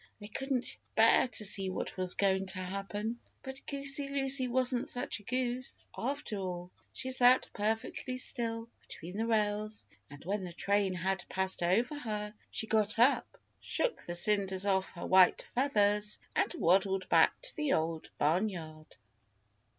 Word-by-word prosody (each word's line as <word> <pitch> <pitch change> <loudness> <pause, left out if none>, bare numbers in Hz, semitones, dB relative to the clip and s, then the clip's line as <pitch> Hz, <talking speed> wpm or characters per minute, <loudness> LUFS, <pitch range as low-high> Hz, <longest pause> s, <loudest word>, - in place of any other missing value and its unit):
They 205 0 -9
couldn't 265 +2 -2 0.2
bear - - +5
to 220 -3 -6
see 195 -1 +1
what 185 - -4
was 185 -1 0
going 195 -1 +2
to 190 0 -3
happen. 200 +5 -4 0.2
But 265 0 -8
Goosey 280 0 +1
Lucy 270 -1 +2
wasn't 250 0 0
such 245 -2 -3
a - - -17
goose, 250 +2 -2
after 265 -4 -3
all. 180 -2 -5 0.2
She 260 - -5
sat 255 0 +5
perfectly 225 +4 -2
still 230 -3 -1 0.2
between 175 +3 -9
the 225 +2 -1
rails, 215 - 0 0.2
and 145 +1 -12
when 200 +1 -1
the 175 -2 -6
train 200 +1 +1
had 190 +1 -1
passed 190 -1 -1
over 230 - +1
her, 210 -4 -4 0.2
she - - -3
got 215 -1 +2
up, 245 +5 +3 0.2
shook - - -1
the 175 - -3
cinders 195 0 +1
off 190 -1 +1
her 175 - -6
white 185 -1 +5
feathers 210 -5 +2 0.2
and - - +2
waddled 190 - +2
back - - +4
to - - -9
the 300 -2 0
Old 160 0 -1
Barnyard! 160 -2 -1
210 Hz, 155 wpm, -32 LUFS, 190-250 Hz, 0.2 s, bear